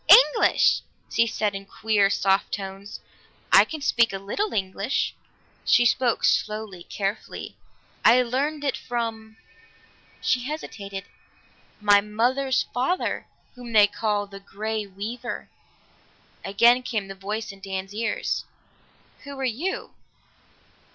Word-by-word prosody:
"English!" 445 - +3 0.3
she 230 - +3
said 215 -2 -1
in 195 0 -5
queer 205 0 +1
soft 195 0 +1
tones. 195 0 -6 0.5
"I - - +9
can 315 -2 -7
speak 235 -4 +3
a 195 - -3
little 210 - -2
English." 195 +5 -1 0.5
She 240 - +4
spoke 240 0 +2
slowly, 215 -4 0
carefully. 200 +4 -4 0.5
"I 250 +1 +6
learned 285 +5 -1
it 275 -3 0
from" 225 -2 -4 0.8
she 255 - +1
hesitated 200 -10 -6 0.8
"my 205 -1 +5
mother's 250 +6 +1
father, 265 +9 -1 0.3
whom 245 -2 -9
they 210 -2 +8
call 205 0 -1
the 200 0 -11
Grey 215 +2 -4
Weaver." 205 +5 -6 0.9
Again 235 +5 +4
came 220 -5 -3
the 195 - -6
voice 205 +3 -4
in 195 - -14
Dan's 195 0 -5
ears. 230 +2 -1 0.8
"Who 280 -1 -8
are - - -2
you?" 270 +11 -3
220 Hz, 120 wpm, -25 LUFS, 200-245 Hz, 0.9 s, I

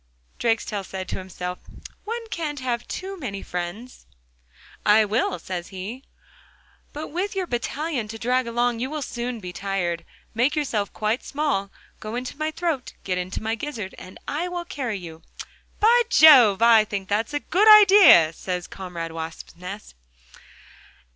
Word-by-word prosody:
Drakestail 225 -3 0
said 190 0 -6
to - - -3
himself, 180 -1 -6 0.5
'One 460 +2 -4
can't 300 -6 -4
have 245 -2 -3
too 385 0 -6
many 200 -9 -5
friends.'... 180 - -6 0.8
'I 215 +1 +5
will,' 210 -3 0
says 175 0 -6
he, 205 +8 -7 0.9
'but 300 +2 -6
with 380 +6 -3
your 380 -1 -1
battalion 275 -1 -3
to 225 +1 -7
drag 250 +2 0
along, 240 0 0
you 255 +2 -2
will 305 -1 -4
soon 240 -1 -4
be 180 -3 -8
tired. 180 -4 -2 0.3
Make 245 +7 +1
yourself 230 -9 -1
quite 215 +3 -1
small, 280 -10 -1 0.3
go 215 +2 -6
into 250 +1 -5
my 310 +2 -2
throat—get 285 - -3
into 180 +4 -5
my 220 +1 -1
gizzard 225 -5 -5
and 185 - -11
I 320 +5 -2
will 350 -1 -4
carry 250 -10 -4
you.' 165 -3 -10 0.6
'By 470 +3 +5
Jove! 260 - +8
that's 215 0 +2
a - - +1
good 390 +8 +2
idea!' 395 - +8
says 180 0 -4
comrade 175 -3 -7
Wasp's 165 0 -7
nest. 185 +4 -9
230 Hz, 150 wpm, -24 LUFS, 190-295 Hz, 0.9 s, Jove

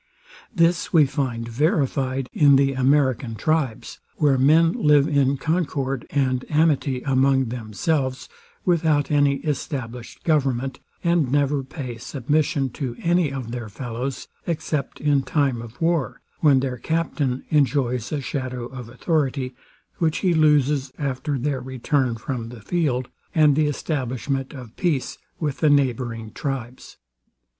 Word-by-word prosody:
This 170 +1 +2
we 160 -4 +6
find 130 -4 -2
verified 135 0 0
in 145 -2 +6
the 135 0 +3
American 130 -3 +2
tribes, 150 -3 -1 0.2
where 145 -3 +3
men 155 +5 +5
live 150 - +4
in 140 -2 +2
concord 140 -4 -1
and 130 -3 0
amity 150 -4 +2
among 135 -2 +2
themselves 130 +4 -2 0.4
without 160 -5 +2
any 145 -1 +4
established 125 -5 -4
government 135 -4 0 0.2
and 170 -6 +2
never 145 0 +2
pay 130 -3 -7
submission 140 +2 0
to 125 -2 -4
any 170 -3 +2
of 130 -4 -5
their 120 -3 -5
fellows, 125 +3 -5 0.2
except 155 -4 -2
in 145 -2 +2
time 135 -3 0
of 115 +1 -11
war, 165 -4 0 0.2
when 140 -4 +5
their 130 -2 -2
captain 150 -4 -1
enjoys 130 -5 +1
a 150 -2 -1
shadow 130 -2 -4
of 125 -2 -8
authority, 135 -2 -1 0.5
which 160 -2 +1
he 180 - +4
loses 150 -3 +3
after 140 0 -2
their 135 0 -1
return 130 0 0
from 115 0 -5
the 120 -2 -10
field, 130 - 0 0.3
and 150 -3 +5
the 155 0 +2
establishment 135 -2 -2
of 125 -6 -10
peace 160 -8 -1 0.2
with 150 -4 -2
the 155 - +4
neighbouring 120 -5 0
tribes. 130 -2 -5
135 Hz, 135 wpm, -23 LUFS, 125-150 Hz, 0.5 s, we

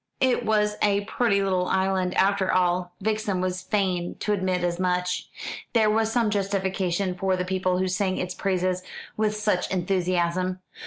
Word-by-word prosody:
It 260 -2 +2
was 210 -1 +1
a 200 -1 +3
pretty 200 -3 +1
little 185 -2 +1
island, 190 -1 +1
after 195 -1 +3
all; 180 0 +1
Vixen 215 -2 0
was 185 0 -2
fain 185 -3 -1
to 210 - +1
admit 185 -2 0
as 175 0 -1
much. 180 0 -1 0.4
There 220 -3 +4
was 220 0 +1
some 230 -3 +2
justification 190 -2 0
for 185 +1 0
the 180 - -2
people 185 0 0
who 185 +1 0
sang 185 +1 0
its 180 0 -3
praises 185 -1 0 0.3
with 215 0 0
such 210 -3 0
enthusiasm. 185 0 0
185 Hz, 160 wpm, -25 LUFS, 180-205 Hz, 0.4 s, There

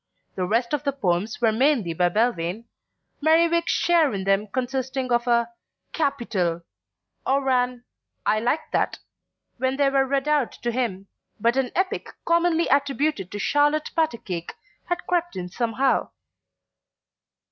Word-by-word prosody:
The 185 -1 -2
rest 235 +6 0
of 295 - 0
the 280 -1 0
poems 200 -4 -1
were 225 -2 +4
mainly 235 - +2
by 175 +2 +2
Belvane, 210 -1 0 0.6
Merriwig's 335 +2 +3
share 335 -4 +3
in 190 - -3
them 195 +2 +1
consisting 260 +2 -2
of 240 0 +1
a 235 -1 +2 0.4
"Capital," 190 - -1 0.6
or 270 +1 +1
an 250 -1 0 0.4
"I 215 - +3
like 245 +8 -1
that," - - 0 0.6
when 260 +1 0
they 280 -1 +3
were 270 -1 +2
read 275 +1 0
out 295 -5 +1
to 240 - -3
him; 225 -6 -2 0.3
but 235 +3 +2
an 265 -2 +1
epic 375 +1 -1 0.2
commonly 335 0 +2
attributed 280 - 0
to 205 - -5
Charlotte 295 +7 +1
Patacake 225 - -2 0.3
had 350 0 -3
crept 350 -1 -1
in 180 -1 -5
somehow. 235 +6 0
255 Hz, 140 wpm, -24 LUFS, 215-290 Hz, 0.6 s, were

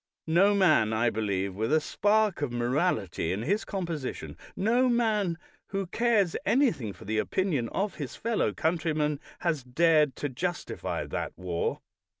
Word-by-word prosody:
No 190 +6 +4
man, 155 - +4
I 115 +1 +2
believe, 100 -3 -1
with 110 +7 -2
a 155 - +5
spark 205 +3 +1
of 145 -4 -1
morality 120 - 0
in 100 +4 -2
his 200 - 0
composition, 170 -9 -4 0.2
no 240 +6 +2
man 215 -7 +1 0.3
who 195 0 -2
cares 210 -2 +1
anything 235 - +2
for - - -13
the 110 +2 0
opinion 150 - 0
of 200 +1 -1
his 145 -5 -5
fellow 230 -1 0
countrymen, 155 -3 0 0.2
has 160 -6 0
dared 150 +1 +3
to 145 - -3
justify 175 +7 -3
that - - -4
war. 90 -2 -2
160 Hz, 150 wpm, -28 LUFS, 120-195 Hz, 0.3 s, a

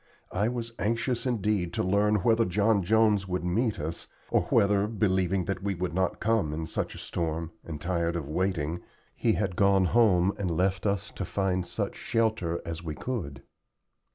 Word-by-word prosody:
I 100 +4 +1
was 115 -1 -4
anxious 115 +4 0
indeed 105 -7 0
to - - 0
learn 100 +3 +3
whether 115 +1 +4
John 105 +2 +2
Jones 105 0 +3
would 90 -1 -2
meet 110 +5 0
us, 80 +3 -5 0.2
or - - +3
whether, 100 0 +3
believing 95 -4 +1
that 95 - -3
we 100 0 -1
would 90 0 -3
not 95 +1 0
come 110 -9 +1
in 80 0 -3
such - - -3
a - - -9
storm, 80 0 -3
and 80 -3 -6
tired 85 0 -1
of 80 -5 -3
waiting, 85 0 -1 0.3
he 115 - +2
had 95 -4 -1
gone 100 -1 +4
home 100 -3 +4
and 95 -3 -1
left 95 +4 0
us 100 -2 -1
to - - -5
find 95 -2 -1
such - - -3
shelter 110 -7 0
as 85 0 -5
we 80 -3 -5
could. 75 - -5
95 Hz, 180 wpm, -28 LUFS, 85-105 Hz, 0.3 s, whether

